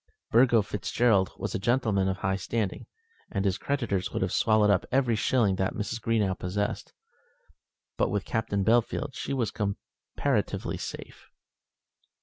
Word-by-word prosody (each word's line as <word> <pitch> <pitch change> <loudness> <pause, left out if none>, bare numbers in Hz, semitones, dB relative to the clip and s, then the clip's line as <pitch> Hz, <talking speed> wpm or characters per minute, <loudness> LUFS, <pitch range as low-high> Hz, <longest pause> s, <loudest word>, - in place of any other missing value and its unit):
Burgo 120 -2 +5
Fitzgerald 100 0 +1
was - - -4
a - - -1
gentleman 110 -3 +1
of 95 0 -1
high 95 0 0
standing, 100 +1 -3 0.4
and 100 -2 -1
his 95 -2 +1
creditors 120 -10 -1
would - - -1
have - - -1
swallowed 110 -2 +4
up 95 - +2
every 130 -3 +2
shilling 105 -4 +2
that 95 -1 -1
Mrs. 110 +2 -3
Greenow 110 -4 +1
possessed; 100 +3 -3 1.1
but - - +2
with 100 -1 -2
Captain 105 -4 -1
Bellfield 120 +4 +1
she - - -5
was 120 -6 0
comparatively 100 -3 -2
safe. - - -8
105 Hz, 140 wpm, -28 LUFS, 95-115 Hz, 1.1 s, Burgo